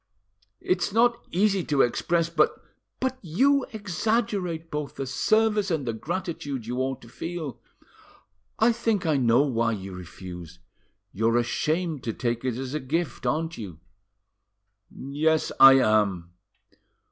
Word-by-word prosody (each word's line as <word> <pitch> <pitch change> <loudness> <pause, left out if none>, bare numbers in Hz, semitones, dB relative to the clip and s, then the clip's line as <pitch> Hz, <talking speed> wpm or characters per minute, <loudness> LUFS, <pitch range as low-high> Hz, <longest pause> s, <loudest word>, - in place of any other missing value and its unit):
"It's 180 +2 0
not 235 +2 +2
easy 195 0 +2
to 145 -2 +2
express, 170 +7 +1
but——" 165 -2 +1 0.4
"But 260 0 -2
you 265 - +2
exaggerate 200 -4 -2
both 150 -1 -4
the 135 - -4
service 210 +8 +2
and 160 -6 -1
the 115 - -2
gratitude 145 - -4
you 125 +2 -3
ought 130 0 -2
to - - -13
feel. 160 0 -6 1.0
I 225 +2 +4
think 225 -5 -1
I 155 -3 +2
know 120 +1 +4
why 115 -5 0
you 95 -2 -6
refuse. 90 -1 -9 0.6
You're 115 +3 +2
ashamed 155 +5 -1
to 115 - -2
take 120 -1 -2
it 130 -3 -1
as 130 +1 -5
a 155 - -1
gift, 150 +2 -2
aren't 165 +1 -1
you." 90 -7 -8 1.1
"Yes, 155 +4 0
I 135 0 +10
am." 105 -8 +2
150 Hz, 135 wpm, -26 LUFS, 120-180 Hz, 1.1 s, I